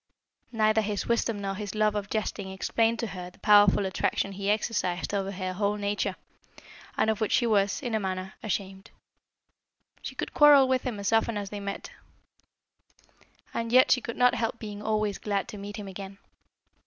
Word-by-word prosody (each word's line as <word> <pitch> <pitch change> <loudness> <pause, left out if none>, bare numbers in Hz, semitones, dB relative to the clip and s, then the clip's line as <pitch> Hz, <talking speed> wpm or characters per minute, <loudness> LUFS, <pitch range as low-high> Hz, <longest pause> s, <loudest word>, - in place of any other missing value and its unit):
Neither 220 -1 +3
his 210 -1 -2
wisdom 230 -2 0
nor 195 0 -2
his 205 0 -6
love 215 -1 +2
of 205 -1 -3
jesting 205 -2 -3
explained 225 +4 0
to - - -1
her 180 -4 -7
the 180 - -22
powerful 205 -1 +5
attraction 190 +1 -1
he 195 +1 -3
exercised 210 -4 -1
over 195 -1 -1
her 185 -1 -4
whole 200 +2 0
nature, 205 -1 -2 0.8
and 220 - +3
of 220 - -4
which 220 - 0
she 240 - +3
was, 205 +1 +1
in 240 -3 -3
a 220 - +2
manner, 190 -1 -4
ashamed. 195 -2 -4 1.1
She - - -7
could - - -5
quarrel 290 -3 +7
with 260 -1 +1
him 225 -5 -4
as 200 +2 -1
often 225 0 +2
as 200 -1 -5
they 205 - -5
met, 200 0 -6 1.6
and 230 0 -3
yet 255 +1 +6
she 250 - +4
could 235 - -6
not 250 0 +5
help 225 0 -1
being 210 -2 -7
always 215 -1 -1
glad 200 -2 -2
to 210 - -8
meet 205 +2 -7
him 205 -2 -7
again. 195 0 -8
205 Hz, 185 wpm, -27 LUFS, 195-225 Hz, 1.6 s, quarrel